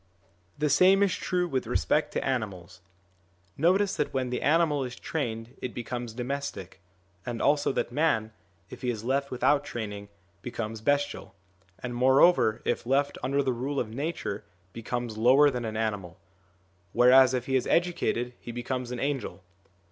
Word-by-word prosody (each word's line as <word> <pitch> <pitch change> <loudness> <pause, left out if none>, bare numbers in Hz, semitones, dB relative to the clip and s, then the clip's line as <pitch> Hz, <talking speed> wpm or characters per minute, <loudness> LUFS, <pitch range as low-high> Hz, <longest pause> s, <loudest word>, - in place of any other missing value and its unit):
The 150 +1 +1
same 195 +2 +5
is 200 - +2
true 180 -1 -1
with 130 -6 -2
respect 150 0 +1
to - - -2
animals: 100 -8 -4 0.7
notice 185 +6 +2
that 150 - -1
when 130 -2 -2
the 125 - -2
animal 150 -2 +2
is 125 -1 -6
trained 120 -7 -4
it 125 - -5
becomes 120 -1 -5
domestic, 125 -8 -5 0.4
and 120 +2 -4
also 145 0 +2
that - - -2
man, 120 -6 +1 0.4
if - - -10
he 125 - -1
is 110 -3 -3
left 140 +3 0
without 140 +3 +2
training, 105 -5 -6 0.3
becomes 115 -3 -5
bestial, 145 0 -1 0.5
and, 125 -1 -4
moreover, 130 -1 +4
if - - -1
left 140 +2 +1
under 140 +2 +1
the 130 -1 0
rule 135 +4 -2
of 110 -2 -3
nature, 140 -7 -3 0.3
becomes 115 -1 -4
lower 135 +5 +6
than 125 -2 -4
an 110 -1 -4
animal; 100 -5 -3 0.7
whereas 130 +1 +6
if 125 -1 -2
he 135 - -1
is 130 - +1
educated 165 -8 0
he 120 - -8
becomes 120 +1 -4
an 125 0 -5
angel. 135 -8 -3
125 Hz, 160 wpm, -28 LUFS, 115-145 Hz, 0.7 s, lower